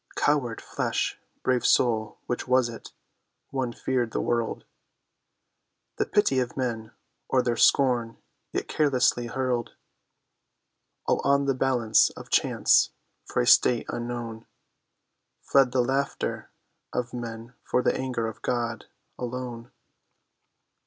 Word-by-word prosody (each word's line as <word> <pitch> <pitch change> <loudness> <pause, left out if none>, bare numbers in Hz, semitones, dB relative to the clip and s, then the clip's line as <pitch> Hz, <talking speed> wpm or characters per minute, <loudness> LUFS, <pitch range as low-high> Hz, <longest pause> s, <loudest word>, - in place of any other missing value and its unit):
Coward 135 -6 +1
flesh, - - -2 0.2
brave 125 -1 +1
soul, 110 -3 +2
which 120 - -3
was 125 -1 +3
it? 115 - -10 0.6
One 130 -3 -1
feared 125 -1 -1
the - - 0
world, 120 -1 -1 1.3
The - - 0
pity 205 -11 +2
of 125 +1 -3
men, 115 -3 -3 0.4
or 130 -1 +3
their 120 -1 0
scorn; 120 -3 +3 0.3
yet - - -3
carelessly 130 -5 +2
hurled 125 -1 -2 1.3
All - - +1
on 140 0 +3
the 135 - +2
balance 125 -4 +3
of - - -11
Chance - - +4 0.4
for - - 0
a - - -1
state 120 -2 +5
unknown; 120 -1 -5 1.0
Fled 135 -3 +4
the 125 0 +2
laughter 135 +3 -2 0.4
of 125 -1 -3
men 115 0 -6
for 125 - 0
the - - +2
anger 125 -3 -2
of 115 - -6
God—alone. 120 0 -5
125 Hz, 120 wpm, -26 LUFS, 115-130 Hz, 1.3 s, state